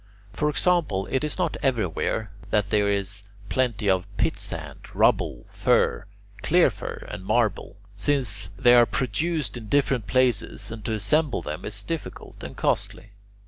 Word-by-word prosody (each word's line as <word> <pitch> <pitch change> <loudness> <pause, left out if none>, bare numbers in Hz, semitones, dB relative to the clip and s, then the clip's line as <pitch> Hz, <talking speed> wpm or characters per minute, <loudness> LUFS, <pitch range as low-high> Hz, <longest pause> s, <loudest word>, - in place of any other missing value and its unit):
For 150 +9 0
example: 150 - +1
it 130 - +1
is 150 - -2
not - - 0
everywhere 110 - 0 0.2
that 105 -1 +1
there 105 -1 +3
is 100 0 -2 0.2
plenty 120 -5 0
of 95 -2 +2
pitsand, - - -2 0.2
rubble, - - +2
fir, - - +2 0.3
clear 160 - +4
fir, 100 - -7
and - - -6
marble, 110 -1 0 0.2
since 105 -2 -1
they 120 -2 +6
are 120 -1 +7
produced 145 +3 -1
in 110 -2 -8
different 135 -6 +1
places 130 -3 +1
and 110 -2 -7
to 110 - -1
assemble 130 +8 +1
them 75 +1 -5
is 105 -1 -5
difficult 165 +5 -6
and - - -8
costly. 105 - -1
110 Hz, 145 wpm, -25 LUFS, 100-135 Hz, 0.3 s, are